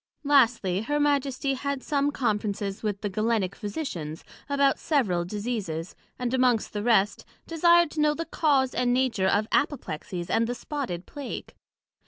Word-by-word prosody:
Lastly, 235 -10 +3
her 295 +6 -1
Majesty 280 -2 +1
had 280 0 -3
some 285 -1 +1
Conferences 210 -6 -2
with 205 -2 -2
the 210 - -1
Galenick 215 -2 0
Physicians 200 - -5 0.3
about 280 -1 +2
several 200 - +1
Diseases, 200 -5 -4 0.2
and 250 -1 -2
amongst 250 -4 +2
the 205 - -2
rest, 210 -3 +2 0.2
desired 340 0 +4
to 310 - -2
know 300 0 +3
the 330 - -3
cause 280 -6 +2
and 245 -1 +1
nature 250 -7 +1
of 205 +3 +2
Apoplexies, 180 - -2
and 230 0 +2
the 245 - -2
spotted 245 - -4
Plague. 285 -3 -7
245 Hz, 150 wpm, -26 LUFS, 205-280 Hz, 0.3 s, desired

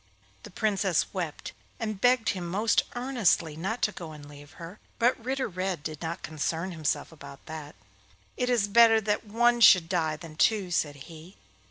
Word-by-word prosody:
The - - -11
Princess 195 -4 0
wept, 170 -6 -5 0.3
and 215 -3 -4
begged 245 -2 +3
him 180 -3 -3
most 210 +6 +1
earnestly 240 - +1
not 195 +9 -4
to 210 - +2
go 165 -6 -9
and 145 -1 -12
leave 145 0 -14
her; 170 +4 -10 0.2
but 245 +2 +3
Ritter 265 +2 -2
Red 185 -4 -3
did 155 -1 -6
not 165 +1 -5
concern 160 +4 -3
himself 155 -3 -2
about 140 -3 -13
that. 155 -2 -8 0.6
'It 250 - -1
is 235 -5 +2
better 225 +1 +6
that 210 0 -2
one 240 +3 +2
should 180 -7 +7
die 165 -3 0
than 155 -1 -12
two,' 200 -3 +2
said 150 -3 0
he. 165 +3 -13
185 Hz, 175 wpm, -27 LUFS, 160-220 Hz, 0.6 s, should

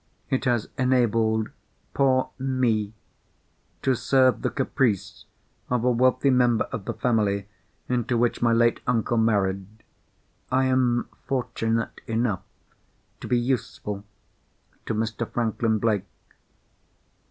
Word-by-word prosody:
It 130 - 0
has 120 -4 +1
enabled 115 -4 +2 0.4
poor 130 -2 +2
Me 125 -6 0 0.9
to 130 - +3
serve 130 +1 +3
the - - 0
caprice 125 -6 -1 0.4
of 125 -2 0
a 125 - +3
wealthy 130 +3 +3
member 125 -3 +3
of 95 - -5
the - - -3
family 105 -5 0 0.4
into 125 -1 0
which 120 0 +1
my 120 -1 +3
late 115 0 +3
uncle 120 -1 +1
married. 100 -4 +1 0.8
I 130 +1 +3
am 130 -2 +2 0.2
fortunate 115 -4 -1
enough 115 -4 0 0.8
to - - -7
be 125 - +2
useful 120 -5 -2 0.8
to 115 - -1
Mr. 115 +1 -2
Franklin 115 -1 0
Blake. 105 -3 0
120 Hz, 115 wpm, -25 LUFS, 110-125 Hz, 0.9 s, to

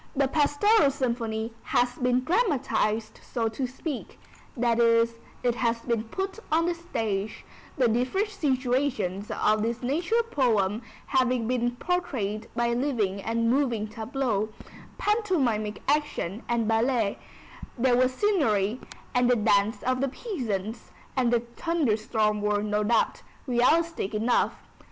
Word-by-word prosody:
The 275 0 +3
Pastoral 295 +5 +4
Symphony 235 -4 -2
has 245 0 +1
been 250 0 +2
dramatized 255 - 0
so 230 -3 -2
to 255 +4 -3
speak, 270 +2 -6 0.4
that 235 -1 +2
is, 230 0 +4 0.3
it 245 -1 +2
has 230 -1 0
been 230 -2 -1
put 385 - -4
on 325 +2 +3
the 350 - +1
stage, 220 -11 -3 0.3
the 255 -3 +4
different 255 - 0
situations 255 - -1
of 215 0 +1
this 230 +3 -2
nature 345 - +1
poem 220 - +2 0.2
having 255 -4 +1
been 240 -1 0
portrayed 245 - -2
by 235 0 +1
living 235 -7 0
and 230 +2 0
moving 245 -6 +1
tableaux, 220 -1 -2 0.5
pantomimic 290 - 0
action 285 - 0
and 235 -2 +1
ballet; 225 -1 +1 0.6
there 245 0 +3
was 255 +1 +3
scenery, 255 - +1 0.3
and 250 0 +3
the 250 - +5
dance 210 0 +2
of 255 0 0
the 275 - +1
peasants 230 - -4 0.3
and 250 -3 +2
the 240 -1 +3 0.2
thunder 330 -10 +1
storm 215 -1 0
were, 210 0 +1
no 210 0 0
doubt, 225 +1 +1 0.2
realistic 260 -1 +2
enough. 230 +3 +1
240 Hz, 130 wpm, -27 LUFS, 220-275 Hz, 0.6 s, the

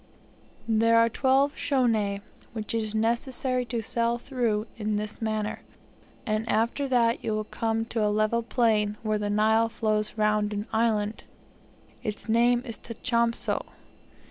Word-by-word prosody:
There 230 +1 +4
are 230 0 +5
twelve 270 +4 +2
schoeni, 225 -7 +1 0.3
which 220 -1 -3
it 225 - +1
is 215 0 -4
necessary 250 +3 0
to 235 -1 -3
sail 235 +2 0
through 235 -4 -1
in 215 -1 -2
this 210 +1 -3
manner; 215 -1 -2 0.6
and 215 -1 -1
after 230 +6 +1
that 235 -3 +2
you 215 - -1
will 215 - -1
come 225 +1 -2
to 225 -1 -1
a 210 - +3
level 215 +2 +1
plain, 220 -3 +1
where 215 -1 0
the 205 0 -2
Nile 220 +2 +3
flows 215 -1 -1
round 210 0 +1
an 205 0 -3
island; 220 -2 0 0.8
its 210 0 -5
name 240 +2 +3
is 230 -4 -6
Tachompso. 235 0 -1
225 Hz, 145 wpm, -27 LUFS, 215-235 Hz, 0.8 s, are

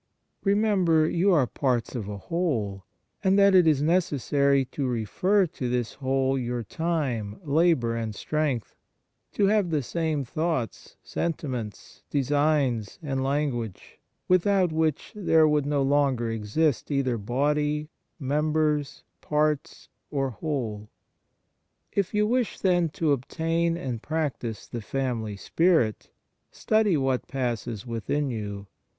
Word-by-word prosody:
Remember 195 -6 +3
you 185 +5 +2
are 150 -7 +4
parts 125 -2 -1
of 110 -6 -4
a 105 - -5
whole, 110 - -2 0.4
and 190 0 +4
that 200 -1 +6
it 180 -3 +6
is 145 -2 +3
necessary 140 -4 +2
to 135 +1 -3
refer 180 - +1
to 130 -6 -4
this 120 -2 -1
whole 135 0 0
your 120 -1 -2
time, 125 -8 -2
labour, 145 -6 +2
and 110 -2 -3
strength; 145 -3 -2 0.6
to 205 - +2
have 205 -2 +2
the 150 -4 0
same 155 0 -1
thoughts, 155 -3 -3
senti 165 -3 -3
ments, 115 -6 -6
designs, 140 -5 +1
and 135 -3 -1
language, 135 -7 -2 0.3
without 185 0 +3
which 155 -2 0
there 160 -6 +4
would 150 -2 +1
no 145 -1 +1
longer 135 -4 +2
exist 115 +7 0
either 135 -5 0
body, 150 +6 0 0.3
members, 150 +1 0 0.2
parts, 150 -1 -1 0.2
or 135 -2 -1
whole. 115 -6 -4 1.0
If 200 -3 0
you 210 0 +2
wish, 240 +1 0
then, 175 -3 +2
to 160 -3 +2
obtain 165 +5 0
and 125 -8 -4
practise 145 -8 -3
the 120 - -6
family 115 -4 -3
spirit, 160 - +1 0.4
study 215 -6 +2
what 135 -2 0
passes 120 -4 -3
within 130 +5 -2
you. 100 -3 -5
145 Hz, 125 wpm, -26 LUFS, 120-160 Hz, 1.0 s, that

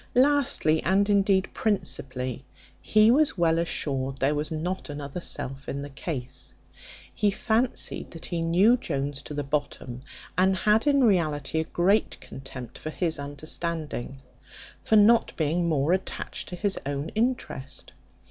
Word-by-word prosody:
Lastly, 255 - +3
and 195 +2 +2
indeed 195 -1 +3
principally, 130 - -2 0.4
he 215 +1 +5
was 290 -3 +3
well 165 -1 +3
assured 135 -5 -2
there 140 +2 +2
was 150 0 -2
not 170 +3 -3
another 145 +3 -5
self 135 -3 -4
in 140 +1 -3
the 145 - -8
case. 130 -4 -5 0.6
He 210 - +2
fancied 230 +4 0
that 165 - -9
he 170 -1 -2
knew 185 +9 +4
Jones 140 - -3
to 150 - -8
the 145 - -1
bottom, 135 -3 -3 0.3
and 190 +2 +3
had 210 - +2
in 280 -2 +4
reality 160 - +2
a 160 - -1
great 195 +7 +1
contempt 130 -2 -9
for 155 - -5
his 160 -1 -1
understanding, 145 -2 -4 0.6
for 220 - +3
not 220 +3 +5
being 170 +2 +1
more 150 +2 +2
attached 190 - -3
to 180 - -5
his 200 +2 -1
own 140 +2 -3
interest. 220 - -2
165 Hz, 145 wpm, -26 LUFS, 140-200 Hz, 0.6 s, he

